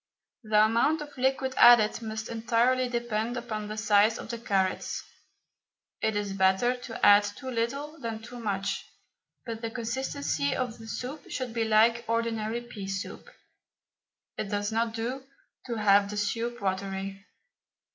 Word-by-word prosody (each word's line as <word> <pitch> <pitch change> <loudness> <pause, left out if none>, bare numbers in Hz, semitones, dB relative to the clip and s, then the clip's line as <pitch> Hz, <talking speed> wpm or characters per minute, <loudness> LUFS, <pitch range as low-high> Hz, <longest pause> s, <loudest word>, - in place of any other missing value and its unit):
The 215 -2 +4
amount 235 +8 +2
of 295 -1 -9
liquid 265 0 0
added 235 -2 +7
must 220 0 -5
entirely 235 +2 +1
depend 235 0 -2
upon 215 -3 -4
the 215 +1 -6
size 215 +1 +4
of - - -8
the 235 - -5
carrots. 195 -5 -1 1.0
It 220 -1 +1
is 205 -1 -2
better 190 +6 +3
to 245 -2 -3
add 205 0 +8
too 205 +6 -6
little 275 +7 -3
than 230 -3 -4
too 240 +2 -10
much, 200 -3 -2 0.6
but 225 -2 -5
the 230 - -2
consistency 235 - -2
of 245 -3 -3
the 225 - -10
soup 255 +7 -6
should 255 -3 -4
be 230 -1 0
like 225 +2 +4
ordinary 230 0 -1
pea 215 -5 -8
soup; 195 - -5 1.1
it 205 - -2
does 205 +1 -1
not 225 0 0
do 245 +4 -3 0.4
to 235 - -2
have 200 -2 +4
the 210 - -5
soup 230 +3 -2
watery. 195 0 -3
225 Hz, 150 wpm, -28 LUFS, 205-240 Hz, 1.1 s, add